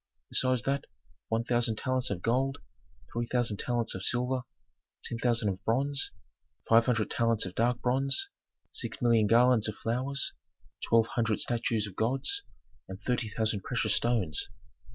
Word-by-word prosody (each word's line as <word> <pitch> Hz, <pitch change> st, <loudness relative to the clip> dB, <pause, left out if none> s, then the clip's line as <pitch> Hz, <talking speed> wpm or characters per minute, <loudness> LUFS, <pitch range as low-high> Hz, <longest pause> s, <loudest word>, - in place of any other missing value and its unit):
Besides 130 Hz, -2 st, +2 dB
that, 140 Hz, 0 st, -1 dB, 0.4 s
one 115 Hz, +1 st, 0 dB
thousand 120 Hz, -2 st, +2 dB
talents 130 Hz, 0 st, 0 dB
of 90 Hz, -3 st, -4 dB
gold, 135 Hz, +4 st, +1 dB, 0.6 s
three 120 Hz, 0 st, -2 dB
thousand 120 Hz, -5 st, 0 dB
talents 120 Hz, 0 st, -1 dB
of 95 Hz, -, -6 dB
silver, 125 Hz, +3 st, +1 dB, 0.6 s
ten 115 Hz, -, -3 dB
thousand 115 Hz, -3 st, +2 dB
of 95 Hz, 0 st, -5 dB
bronze, 135 Hz, +5 st, +1 dB, 0.6 s
five 115 Hz, +1 st, +5 dB
hundred 115 Hz, -5 st, +1 dB
talents 115 Hz, -5 st, +1 dB
of 95 Hz, -, -6 dB
dark 120 Hz, +4 st, +1 dB
bronze, 135 Hz, +2 st, +2 dB, 0.4 s
six -, -, -3 dB
million 115 Hz, -3 st, +4 dB
garlands 120 Hz, 0 st, +5 dB
of 105 Hz, -, -5 dB
flowers, 130 Hz, +4 st, -1 dB, 0.5 s
twelve 115 Hz, -1 st, +4 dB
hundred 115 Hz, -2 st, 0 dB
statues 115 Hz, -2 st, 0 dB
of 100 Hz, -3 st, -9 dB
gods, 135 Hz, -, +1 dB, 0.5 s
and 95 Hz, 0 st, -8 dB
thirty 120 Hz, -3 st, 0 dB
thousand 110 Hz, -1 st, -1 dB
precious 125 Hz, +4 st, 0 dB
stones. 110 Hz, -10 st, +1 dB
120 Hz, 150 wpm, -30 LUFS, 110-125 Hz, 0.6 s, five